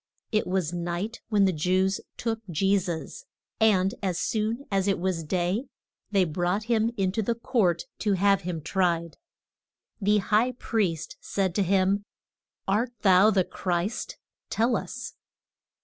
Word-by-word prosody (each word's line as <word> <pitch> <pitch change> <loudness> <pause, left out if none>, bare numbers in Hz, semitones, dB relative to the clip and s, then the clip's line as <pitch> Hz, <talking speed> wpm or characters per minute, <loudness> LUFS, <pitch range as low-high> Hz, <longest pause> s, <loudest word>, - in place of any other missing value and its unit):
It 215 -2 +1
was 180 -3 -1
night 175 +6 -3
when 205 -3 +4
the 190 - +2
Jews 185 +4 +1 0.2
took 225 -1 -2
Je 195 +4 +2
sus, 175 - -5 0.4
and 195 -4 +4
as 185 -4 -1
soon 225 +5 -1
as 195 0 +1
it 195 - +2
was 180 -2 -1
day 180 - -1 0.4
they 195 -3 +3
brought 175 +5 -1
him 230 0 +1
in 190 -2 +1
to 220 +3 0
court 215 -8 +1 0.2
to 210 -2 +1
have 195 +1 +3
him 175 -3 -4
tried. 170 -3 0 0.8
The 205 +2 +4
high 220 +5 +2
priest 200 -10 -2
said 190 -3 -1
to 205 - +1
him, 195 +1 +2 0.6
Art 225 +5 +1
thou 190 +1 +6
the 195 -4 +3
Christ? 185 - -3 0.3
tell 235 +2 +2
us. - - -5
195 Hz, 145 wpm, -27 LUFS, 180-215 Hz, 0.8 s, thou